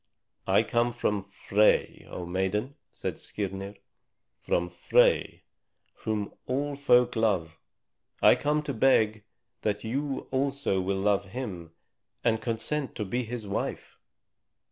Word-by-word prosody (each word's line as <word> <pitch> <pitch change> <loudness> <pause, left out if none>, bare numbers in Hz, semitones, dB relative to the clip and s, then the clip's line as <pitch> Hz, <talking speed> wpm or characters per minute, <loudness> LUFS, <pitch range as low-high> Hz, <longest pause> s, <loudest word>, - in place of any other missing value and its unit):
"I - - +4
come 120 0 +1
from 105 -4 0
Frey, 100 +2 +1
O 90 - -5
maiden," 95 +8 -1 0.2
said - - -5
Skirnir, 100 0 -5 0.6
"from 90 - 0
Frey, 90 0 +2 0.5
whom 105 -2 -3
all 140 +3 -1
folk 125 -3 +4
love. 95 -8 0 0.6
I - - +7
come 150 +1 0
to 145 -2 -3
beg 110 -4 +3 0.4
that 105 -1 -1
you 135 +4 -2
also 135 -7 0
will 95 +1 -1
love 100 0 +2
him 95 -7 -6 0.5
and 110 -1 +2
consent 125 +6 -2
to 105 - -3
be 120 +5 -2
his 115 -1 -5
wife. 100 - -4
110 Hz, 120 wpm, -28 LUFS, 95-130 Hz, 0.6 s, I